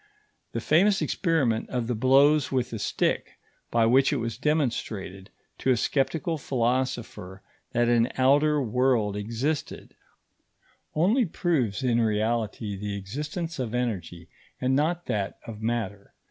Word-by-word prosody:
The -, -, -2 dB
famous 195 Hz, +5 st, +3 dB
experiment 145 Hz, -, 0 dB
of 125 Hz, -2 st, -2 dB
the 120 Hz, -, -1 dB
blows 135 Hz, +5 st, +4 dB
with 125 Hz, -2 st, -1 dB
a 115 Hz, -, -4 dB
stick -, -, -1 dB, 0.4 s
by 115 Hz, -1 st, +3 dB
which 135 Hz, +4 st, +4 dB
it 145 Hz, -, +1 dB
was 115 Hz, -2 st, -3 dB
demonstrated 115 Hz, -, -2 dB, 0.3 s
to -, -, -1 dB
a 125 Hz, -, +4 dB
sceptical 155 Hz, +5 st, 0 dB
philosopher 120 Hz, -7 st, -2 dB, 0.3 s
that 120 Hz, 0 st, +2 dB
an 120 Hz, +1 st, +3 dB
outer 145 Hz, +3 st, +4 dB
world 125 Hz, -4 st, +1 dB
existed, 115 Hz, +9 st, -3 dB, 1.0 s
only 210 Hz, -, +3 dB
proves, 140 Hz, -, -1 dB
in 120 Hz, -2 st, +2 dB
reality, 110 Hz, -1 st, -1 dB
the 100 Hz, +1 st, -4 dB
existence 150 Hz, -, -5 dB
of 120 Hz, -2 st, -3 dB
energy, 90 Hz, -8 st, -3 dB, 0.3 s
and 130 Hz, +1 st, +1 dB
not 170 Hz, +5 st, 0 dB
that 100 Hz, -2 st, -2 dB
of 110 Hz, -2 st, -8 dB
matter. 110 Hz, -3 st, -3 dB
125 Hz, 130 wpm, -26 LUFS, 110-145 Hz, 1.0 s, blows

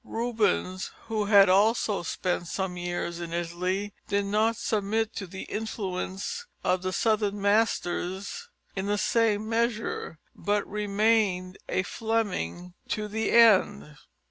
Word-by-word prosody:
Rubens, 215 Hz, -5 st, -1 dB, 0.2 s
who 215 Hz, -2 st, 0 dB
had 200 Hz, -1 st, +7 dB
also 205 Hz, +2 st, +3 dB
spent 175 Hz, 0 st, -2 dB
some 190 Hz, +1 st, -3 dB
years 175 Hz, -1 st, -3 dB
in 170 Hz, -1 st, -5 dB
Italy, 180 Hz, +4 st, -2 dB
did 200 Hz, 0 st, +1 dB
not 215 Hz, +3 st, +2 dB
submit 220 Hz, +1 st, -1 dB
to 195 Hz, -, -4 dB
the 190 Hz, +2 st, -7 dB
influence 200 Hz, -, -4 dB, 0.2 s
of 180 Hz, 0 st, +1 dB
the 185 Hz, 0 st, -2 dB
southern 210 Hz, +1 st, +1 dB
masters 200 Hz, -, 0 dB, 0.3 s
in 195 Hz, 0 st, -2 dB
the 205 Hz, 0 st, +1 dB
same 215 Hz, -1 st, +2 dB
measure, 230 Hz, -6 st, -1 dB, 0.2 s
but 205 Hz, 0 st, 0 dB
remained 205 Hz, -3 st, +1 dB
a 185 Hz, -, +1 dB
Fleming 190 Hz, -, -2 dB
to 215 Hz, -1 st, -2 dB
the 220 Hz, +2 st, -1 dB
end. 190 Hz, -, +5 dB
200 Hz, 125 wpm, -27 LUFS, 185-220 Hz, 0.3 s, had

